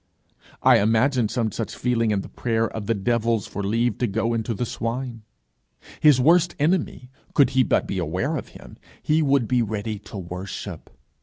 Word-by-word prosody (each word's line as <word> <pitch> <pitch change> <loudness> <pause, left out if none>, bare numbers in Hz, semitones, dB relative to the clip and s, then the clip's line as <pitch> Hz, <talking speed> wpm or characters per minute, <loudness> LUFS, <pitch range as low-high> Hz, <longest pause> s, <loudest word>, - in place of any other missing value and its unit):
I - - +6
imagine 115 +2 +2
some 110 -2 -1
such 115 - -4
feeling 115 -2 0
in 105 -2 +1
the - - -9
prayer 115 -1 -1
of 110 -2 -7
the 115 - +1
devils 115 +1 0
for 105 - -5
leave 115 +3 0
to 125 - +1
go 115 +3 -1
into 115 0 -2
the 120 - -2
swine. 120 0 -4 0.8
His 150 -4 +6
worst 170 +5 +4
enemy, 150 -5 -1 0.2
could 140 -3 +5
he 130 - +3
but - - +2
be 95 - -3
aware 90 - -1
of 135 - -5
him, - - -14 0.3
he 155 +1 +2
would 140 -5 +2
be 125 +1 +2
ready 110 -1 -3
to 105 +1 -10
worship. 90 +1 -7
115 Hz, 180 wpm, -23 LUFS, 105-130 Hz, 0.8 s, I